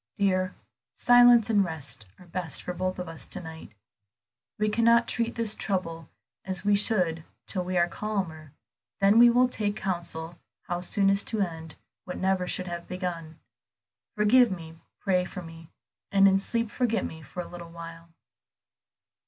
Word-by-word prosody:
"Dear, 185 -2 +1 0.4
silence 245 -2 +6
and 210 -3 +3
rest 135 - -5
are 180 - -16
best 175 -2 -4
for 180 - -4
both 185 +1 -2
of 180 -1 -5
us 165 -1 -8
to 190 - -4
night. 160 -10 -10 0.8
We 215 - +1
cannot 235 +2 +4
treat 235 -1 -1
this 230 -2 +1
trouble 165 -7 -3 0.3
as 190 0 -3
we 205 0 +4
should 180 -6 +2 0.2
till 185 - -1
we 180 0 -2
are 175 0 +4
calmer; 175 -6 -4 0.5
then 200 +3 +5
we 240 0 +9
will 250 +2 +4
take 210 -4 -2
counsel 170 -4 -4 0.2
how 175 0 -3
soonest 195 +2 +2
to 220 -2 -1
end 160 -4 -4 0.3
what 180 - -6
never 190 -1 0
should 185 - -2
have 170 -1 -6
been 185 - -5
begun. 165 -3 -5 0.8
Forgive 235 +4 +5
me, 165 -3 -8 0.2
pray 185 -2 +1
for 180 0 -7
me, 165 -1 -12 0.4
and 195 0 +6
in 195 0 +4
sleep 230 +2 -2
forget 235 -3 0
me 160 - -8
for 155 +4 -7
a - - -11
little 170 -1 -10
while." 165 0 -10
185 Hz, 165 wpm, -27 LUFS, 165-210 Hz, 0.8 s, we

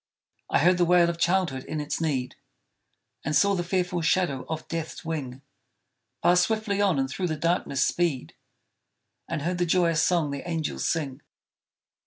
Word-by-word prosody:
I - - +3
heard 180 +4 +4
the 175 - +4
wail 175 0 +4
of 170 - -9
childhood 170 -7 +1
in 155 - -4
its 150 +2 -3
need, 135 -6 -1 0.9
And 150 +1 -1
saw 200 +4 +4
the 175 -2 -1
fearful 180 -1 -1
shadow 160 -5 0
of 160 -1 -4
Death's 165 +1 -5
wing 140 -5 -5 0.8
Pass 180 0 +5
swiftly 215 0 0
on 190 -7 +2
and 135 0 +1
through 180 +7 -3
the 160 - -2
darkness 165 -5 +1
speed, 165 -7 -1 1.0
And 155 -3 -3
heard 175 +2 -1
the 175 - +2
joyous 165 -2 +3
song 170 -5 +1
the 140 +5 -5
angels 160 -2 -2
sing! 145 -4 -2
165 Hz, 165 wpm, -26 LUFS, 150-180 Hz, 1.0 s, Pass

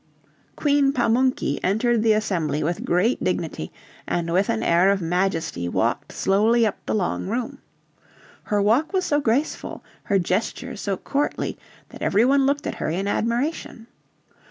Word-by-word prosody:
Queen 285 -2 +2
Pamunky 245 - +1
entered 220 +4 +1
the 220 -1 +4
Assembly 165 -8 -1
with 170 +3 -2
great 185 +8 +1
dignity, - - -2 0.4
and 170 -1 -1
with 190 +4 +2
an 225 -1 0
air 175 +3 +4
of 200 0 +2
majesty 165 - -1
walked - - -1
slowly 220 +4 +2
up 215 - -3
the - - 0
long 185 -2 -1
room. 235 +3 -3 0.9
Her 210 - 0
walk 245 - +2
was 375 -1 +1
so 290 - +2
graceful, 270 +4 -1 0.2
her 200 - +2
gestures 210 +6 -2
so 195 -2 -2
courtly, 290 +1 -2 0.3
that - - -13
every 210 +4 +3
one 275 +1 +3
looked 285 +1 0
at - - -2
her - - -1
in 185 +5 -2
admiration. 240 +4 -2
220 Hz, 155 wpm, -23 LUFS, 185-255 Hz, 0.9 s, the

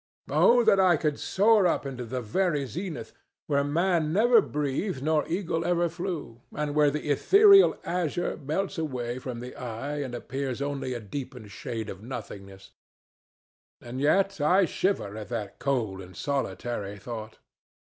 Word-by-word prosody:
Oh 245 0 +5
that 200 - +4
I 180 -3 +5
could 150 -1 -1
soar 205 -1 +4
up 165 - 0
into 130 -3 -5
the 125 +2 -4
very 145 - 0
zenith, 170 - -6 0.3
where 140 -1 +1
man 165 +1 +1
never 230 +5 +5
breathed 145 0 -2
nor 155 0 +1
eagle 170 -2 -1
ever 175 0 +1
flew, 170 -9 -5
and 150 0 -2
where 150 -1 +4
the 150 +1 -2
ethereal 395 - +6
azure 175 -1 -1
melts 170 +6 -3
away 125 -5 -3
from 125 -2 -6
the 125 +1 -8
eye 125 +5 -5
and 130 -3 -4
appears 135 +1 -4
only 140 -2 -3
a - - -3
deepened 115 0 -7
shade 115 +1 -5
of 95 -2 -8
nothingness! 100 -5 -9 1.1
And 125 +2 -6
yet 195 +4 +2
I 180 +6 +4
shiver 165 - -1
at 105 - -7
that 110 -5 -5
cold 115 -9 -1
and 90 0 -12
solitary 120 -7 -3
thought. 110 +1 -7
145 Hz, 155 wpm, -27 LUFS, 120-175 Hz, 1.1 s, ethereal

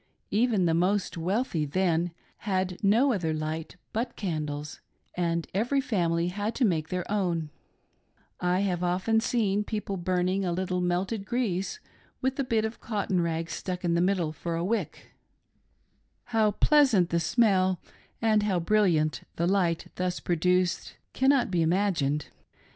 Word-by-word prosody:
Even 215 -3 +2
the 165 - +2
most 185 +4 +1
wealthy, 180 0 -1
then, 170 +2 +1 0.3
had 185 -2 -2
no 235 +7 +4
other 165 -6 -1
light 155 +2 -4 0.2
but 230 +4 -2
candles, 150 -5 -4 0.3
and 170 -1 0
every 240 +8 +1
family 175 -9 0
had 205 +4 -3
to 260 - +2
make 160 -6 0
their 180 -1 -2
own: 170 -7 0 0.9
I 180 +1 +1
have 180 -3 -1
often 185 +5 +2
seen 210 -3 +1
people 210 -2 -3
burning 185 +2 0
a 180 - 0
little 180 0 -1
melted 185 +4 -1
grease 215 - -2 0.4
with 265 +1 -1
a - - +2
bit 225 -4 +1
of 220 +1 -5
cotton 200 -5 -1
rag 165 -1 -1
stuck 180 -1 -4
in 170 - +2
the 170 - +2
middle 180 -4 +1
for 170 +1 -4
a 170 +1 -1
wick 230 +4 -3 0.5
— - - -43
how 220 -1 +4
pleasant 225 - +4
the 170 - +2
smell, 185 -1 +2 0.4
and 220 -2 +3
how 200 -4 +1
brilliant 165 - +2
the 170 - 0
light 175 -3 +1
thus 180 0 -1
produced 180 +1 0 0.2
can 265 -1 +3
be 175 -2 +2
imagined. 160 -5 +1
185 Hz, 150 wpm, -28 LUFS, 170-210 Hz, 0.9 s, no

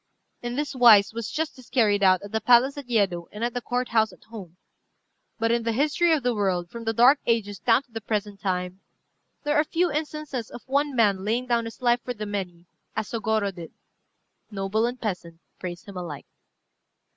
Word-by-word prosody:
In 240 0 -4
this 290 +1 -2
wise 225 -6 +6
was 230 -1 -4
justice 300 -6 -4
carried 210 -5 +2
out 185 -1 +4
at 205 - -9
the 220 0 -1
palace 250 +3 +5
at 280 -4 -9
Yedo 190 -7 +1
and 210 +2 -6
at 240 0 -1
the 245 - -3
Court 245 +1 -2
house 220 -1 +2
at - - -18
home. 190 -7 -11 0.8
But 230 0 +1
in 235 0 +2
the 230 0 -1
history 300 +7 +2
of 310 -5 +2
the 245 0 +1
world, 185 -5 -1
from 230 -1 -8
the 225 - +1
dark 250 +6 +6
ages 205 -4 0
down 240 +3 +3
to 250 - -34
the 225 0 -6
present 205 -1 -3
time, 180 0 -2 0.6
there 295 0 0
are 300 - +4
few 340 +2 0
instances 300 -5 -4
of - - -10
one 280 +1 0
man 200 -5 +3
laying 230 +5 0
down 235 -2 +1
his 225 +3 -9
life 240 0 +3
for 250 - -4
the 210 -1 -5
many, 185 -4 -5 0.3
as 220 -1 -3
Sôgorô 220 -3 0
did: 170 -3 -10 0.8
noble 205 +3 0
and 245 +1 -5
peasant 180 -6 -5 0.2
praise 175 -1 -6
him 200 -2 -10
alike. 165 -6 -6
225 Hz, 205 wpm, -25 LUFS, 200-250 Hz, 0.8 s, wise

